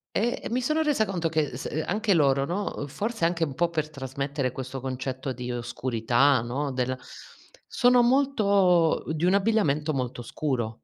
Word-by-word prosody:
Ehm, 240 Hz, +3 st, -1 dB
mi 250 Hz, +2 st, 0 dB
sono 305 Hz, +5 st, +1 dB
resa 290 Hz, -8 st, +2 dB
conto 175 Hz, -5 st, -2 dB
che 155 Hz, -5 st, -1 dB
s -, -, -5 dB, 0.2 s
anche 205 Hz, +1 st, +1 dB
loro, 135 Hz, -3 st, +3 dB
no, 190 Hz, +6 st, -3 dB
uhm, 145 Hz, -, -3 dB
forse 215 Hz, -, -2 dB
anche 170 Hz, -1 st, 0 dB
un 140 Hz, -4 st, -5 dB
po' 170 Hz, +2 st, +1 dB
per 155 Hz, -2 st, -2 dB
trasmettere 140 Hz, -1 st, -3 dB
questo 130 Hz, +1 st, -6 dB
concetto 130 Hz, +1 st, -4 dB
di 125 Hz, 0 st, -5 dB
oscurità, 120 Hz, +2 st, +1 dB
no, 135 Hz, +4 st, -3 dB
del 130 Hz, 0 st, -1 dB, 0.7 s
sono 245 Hz, 0 st, +5 dB
molto 200 Hz, -, +3 dB
di 160 Hz, +2 st, -2 dB
un 185 Hz, +2 st, +4 dB
abbigliamento 165 Hz, -8 st, +2 dB
molto 125 Hz, -2 st, -3 dB
scuro. 120 Hz, -4 st, -3 dB
150 Hz, 165 wpm, -26 LUFS, 130-200 Hz, 0.7 s, sono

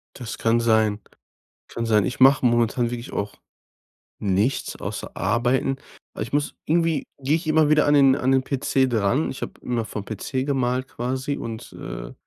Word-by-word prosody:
Das 120 Hz, -3 st, -6 dB
kann 115 Hz, +1 st, +2 dB
sein 110 Hz, -2 st, +2 dB, 0.7 s
kann 115 Hz, -, -3 dB
sein. 105 Hz, -4 st, +3 dB
Ich 125 Hz, -, -4 dB
mache 135 Hz, 0 st, +6 dB
momentan 120 Hz, 0 st, +2 dB
wirklich 120 Hz, 0 st, -6 dB
auch 100 Hz, 0 st, -3 dB, 0.8 s
nichts 105 Hz, +6 st, 0 dB
außer -, -, -5 dB
Arbeiten. 125 Hz, +3 st, +1 dB, 0.4 s
Aber -, -, -4 dB
ich 115 Hz, -, -9 dB
muss 145 Hz, 0 st, 0 dB
irgendwie 165 Hz, -1 st, +1 dB, 0.2 s
gehe 140 Hz, +3 st, +2 dB
ich 165 Hz, 0 st, -4 dB
immer 155 Hz, -1 st, +4 dB
wieder 150 Hz, 0 st, +4 dB
an 145 Hz, -, +4 dB
den 135 Hz, -2 st, +6 dB
an 130 Hz, -1 st, +1 dB
den 130 Hz, 0 st, +3 dB
PC 135 Hz, 0 st, +1 dB
dran. 115 Hz, +5 st, +1 dB
Ich 130 Hz, -, -8 dB
habe -, -, -4 dB
immer 120 Hz, -2 st, -1 dB
vom 105 Hz, -2 st, -6 dB
PC 130 Hz, +5 st, -3 dB
gemalt 130 Hz, -2 st, 0 dB
quasi 130 Hz, +4 st, -3 dB
und, 115 Hz, 0 st, -7 dB
äh -, -, -7 dB
125 Hz, 175 wpm, -23 LUFS, 115-135 Hz, 0.8 s, mache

